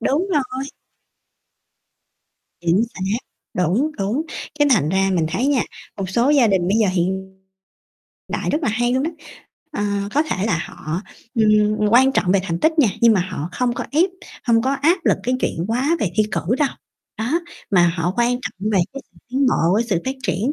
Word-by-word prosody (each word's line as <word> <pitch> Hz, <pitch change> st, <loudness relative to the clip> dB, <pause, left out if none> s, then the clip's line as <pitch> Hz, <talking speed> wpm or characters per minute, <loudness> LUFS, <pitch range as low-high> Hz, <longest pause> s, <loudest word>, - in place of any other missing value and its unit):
đúng 300 Hz, +10 st, +1 dB
rồi. 260 Hz, -2 st, -1 dB, 2.0 s
Chính 175 Hz, +5 st, +2 dB
xác. 195 Hz, +4 st, -1 dB, 0.4 s
Đúng, 185 Hz, -, +1 dB
đúng. 210 Hz, +10 st, 0 dB, 0.4 s
Cái 290 Hz, -, +4 dB
thành 175 Hz, -, +3 dB
ra 195 Hz, +2 st, +2 dB
mình 160 Hz, -2 st, +1 dB
thấy 250 Hz, +10 st, -1 dB
nha, 280 Hz, -5 st, +2 dB, 0.3 s
một 190 Hz, -2 st, -4 dB
số 240 Hz, +7 st, +2 dB
gia 275 Hz, -6 st, +5 dB
đình 185 Hz, -4 st, +1 dB
bây 205 Hz, -, +2 dB
giờ 215 Hz, -, +4 dB
hiện 190 Hz, +2 st, -2 dB, 0.9 s
đại -, -, -2 dB
rất 305 Hz, +2 st, -1 dB
là -, -, +1 dB
hay 240 Hz, +3 st, +1 dB
luôn 260 Hz, +1 st, +1 dB
đó. 325 Hz, -, -1 dB, 0.6 s
Ờ, 280 Hz, -, -2 dB, 0.3 s
có 295 Hz, -, +4 dB
thể 210 Hz, -11 st, -2 dB
là 170 Hz, -7 st, +1 dB
họ, 155 Hz, +3 st, -5 dB, 0.3 s
ừm, 215 Hz, -1 st, +3 dB
quan 265 Hz, +4 st, +5 dB
trọng 180 Hz, -7 st, +2 dB
về 200 Hz, -, +3 dB
thành 170 Hz, -3 st, -2 dB
tích 320 Hz, 0 st, +2 dB
nha, 260 Hz, -8 st, +6 dB
nhưng 230 Hz, -1 st, +6 dB
mà 190 Hz, -, +3 dB
họ 160 Hz, -2 st, -4 dB
không 250 Hz, -1 st, 0 dB
có -, -, -4 dB
ép, 350 Hz, +5 st, +3 dB, 0.3 s
hông 230 Hz, -1 st, +3 dB
có 265 Hz, -, +1 dB
áp 325 Hz, +7 st, +2 dB
lực -, -, +3 dB
cái 250 Hz, +1 st, 0 dB
chuyện 165 Hz, -, -1 dB
quá 265 Hz, +9 st, +1 dB
về 190 Hz, -, 0 dB
thi 215 Hz, -, +5 dB
cử -, -, 0 dB, 0.2 s
đâu. 295 Hz, -, +3 dB, 0.5 s
Đó, 250 Hz, +10 st, 0 dB, 0.3 s
mà 175 Hz, -3 st, +5 dB
họ 175 Hz, +2 st, 0 dB
quan 240 Hz, 0 st, +3 dB
trọng 210 Hz, 0 st, -4 dB
về 200 Hz, -, +3 dB
cái 275 Hz, 0 st, -7 dB
sự -, -, -22 dB
tiến 270 Hz, +2 st, +2 dB
bộ 170 Hz, -8 st, +2 dB
với 220 Hz, -, +3 dB
sự 185 Hz, -7 st, -1 dB
phát 265 Hz, +1 st, -2 dB
triển 230 Hz, +9 st, 0 dB
225 Hz, 200 wpm, -21 LUFS, 190-265 Hz, 2.0 s, nha